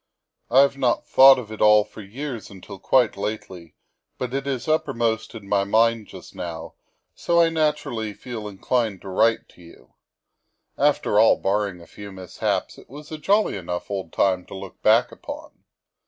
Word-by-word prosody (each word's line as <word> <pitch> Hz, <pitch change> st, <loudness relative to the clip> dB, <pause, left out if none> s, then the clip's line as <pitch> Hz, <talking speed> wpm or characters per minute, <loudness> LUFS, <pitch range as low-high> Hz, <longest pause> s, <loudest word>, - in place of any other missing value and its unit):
I 135 Hz, -, +6 dB
have 140 Hz, 0 st, +1 dB
not 125 Hz, -3 st, +1 dB
thought 135 Hz, 0 st, +7 dB
of 115 Hz, -4 st, -7 dB
it 110 Hz, -, -8 dB
all 105 Hz, 0 st, +6 dB
for 110 Hz, -, -12 dB
years 120 Hz, +2 st, -7 dB
until 95 Hz, 0 st, -11 dB
quite 125 Hz, +3 st, +2 dB
lately, 100 Hz, -5 st, -6 dB, 0.4 s
but 125 Hz, 0 st, -4 dB
it 135 Hz, 0 st, -3 dB
is 135 Hz, -1 st, -3 dB
uppermost 120 Hz, -9 st, -1 dB
in 105 Hz, -3 st, -10 dB
my 100 Hz, -1 st, +2 dB
mind 110 Hz, +2 st, +2 dB
just -, -, -12 dB
now, 85 Hz, -2 st, -7 dB, 0.4 s
so 170 Hz, 0 st, +1 dB
I 165 Hz, -1 st, +5 dB
naturally 150 Hz, -9 st, -1 dB
feel 115 Hz, -4 st, -7 dB
inclined 105 Hz, 0 st, -2 dB
to 100 Hz, -, -8 dB
write 115 Hz, +4 st, +2 dB
to -, -, -20 dB
you. 85 Hz, -1 st, -17 dB, 0.8 s
After 140 Hz, -7 st, +2 dB
all, 110 Hz, -, +6 dB
barring 100 Hz, -2 st, -1 dB
a -, -, -13 dB
few 100 Hz, +4 st, -11 dB
mishaps, 95 Hz, -2 st, -3 dB
it -, -, -18 dB
was 150 Hz, +4 st, -12 dB
a 155 Hz, -, -6 dB
jolly 205 Hz, +6 st, +2 dB
enough 90 Hz, 0 st, -5 dB
old 95 Hz, -5 st, -4 dB
time 95 Hz, -2 st, +1 dB
to -, -, -9 dB
look 95 Hz, 0 st, -10 dB
back -, -, +4 dB
upon. -, -, -10 dB
110 Hz, 175 wpm, -23 LUFS, 95-130 Hz, 0.8 s, thought